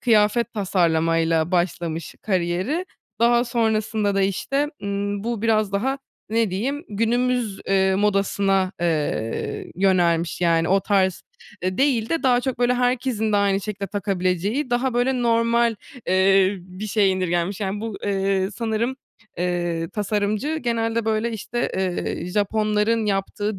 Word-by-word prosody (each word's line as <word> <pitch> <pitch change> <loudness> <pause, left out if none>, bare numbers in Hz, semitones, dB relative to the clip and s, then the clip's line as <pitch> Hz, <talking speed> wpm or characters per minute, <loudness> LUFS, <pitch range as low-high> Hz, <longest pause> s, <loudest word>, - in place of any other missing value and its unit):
kıyafet 230 0 +3
tasarlama 165 -5 +1
ile 165 0 +1
başlamış 170 -3 -1
kariyeri. 190 - -1 0.3
Daha 240 +1 +4
sonrasında 220 -3 0
da 195 - +2
işte, 275 +10 0
ımm, 200 +1 -2
bu 235 -2 -2
biraz 215 -3 +2
daha 265 +7 0 0.3
ne 225 -2 +1
diyeyim 270 - -2
günümüz, 235 0 0
ııı, 190 0 +3
modasına, 195 -1 +1
eee, 150 -9 -2
yönelmiş, 175 -3 +2
yani 165 -1 +2
o 195 +1 +4
tarz, 190 -3 +1 0.4
eee, 185 0 -2
değil 255 -5 +2
de 330 - -1
daha 250 -2 +4
çok 260 -1 -3
böyle 245 0 +3
herkesin 245 -3 0
de - - +4
aynı 200 -1 +2
şekilde 200 -1 -4
takabileceği 195 - -1
daha 245 +1 0
böyle 245 0 +1
normal, 230 0 +2 0.3
eee, 190 +1 +4
bir 185 +4 -8
şeye 205 -1 +3
indirgenmiş. 185 +1 -1
Yani 200 +1 -2
bu, 225 -2 -4
eee, 195 -1 0
sanırım, 230 +4 -2 0.4
eee, 175 -2 -1
tasarımcı 210 +8 -1
genelde, 230 -3 -1
böyle, 220 +1 0
işte, 240 +2 -3
eee, 185 -2 -2
Japonların 210 +3 +1
yaptığı 200 +1 -2
205 Hz, 135 wpm, -23 LUFS, 185-230 Hz, 0.4 s, Daha